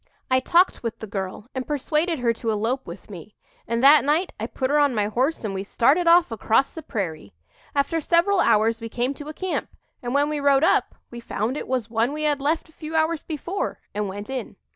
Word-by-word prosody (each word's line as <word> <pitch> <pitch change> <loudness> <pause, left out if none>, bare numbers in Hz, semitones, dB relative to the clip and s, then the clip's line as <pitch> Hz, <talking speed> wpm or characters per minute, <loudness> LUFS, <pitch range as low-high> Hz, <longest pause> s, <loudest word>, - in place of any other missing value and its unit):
"I 255 - +5
talked 345 +8 +3
with 230 -2 -4
the - - -7
girl 195 0 -5
and 260 -1 -4
persuaded 305 +3 0
her 240 -2 +1
to 230 0 -4
elope 225 +5 -1
with - - -9
me; - - -10 0.3
and 235 +1 -1
that 290 +2 +8
night 310 +6 +1
I 220 - -3
put 260 +2 -2
her 295 - +4
on 285 -4 +3
my 210 -1 +1
horse 255 +9 -1
and 210 -3 -3
we 190 0 -3
started 280 - +2
off 335 -4 +5
across 225 +4 +1
the 320 - -8
prairie. 160 - -5 0.4
After 285 +4 +1
several 350 +5 +3
hours 225 -4 +3
we 230 - -5
came 245 +4 -1
to 290 +1 -10
a - - -6
camp; 375 -1 -3 0.3
and 245 +2 -3
when 285 +1 +3
we 300 0 -2
rode 280 0 +3
up - - +2 0.2
we 240 - -7
found 230 +1 -3
it - - -5
was 255 -4 -1
one 230 +4 +1
we 305 0 -4
had 295 -2 +1
left 315 +4 0
a - - -21
few 310 +1 -7
hours 320 0 +1
before 340 +5 -4
and 210 0 -2
went 205 +2 -7
in. 260 -6 -5
265 Hz, 230 wpm, -24 LUFS, 225-305 Hz, 0.4 s, that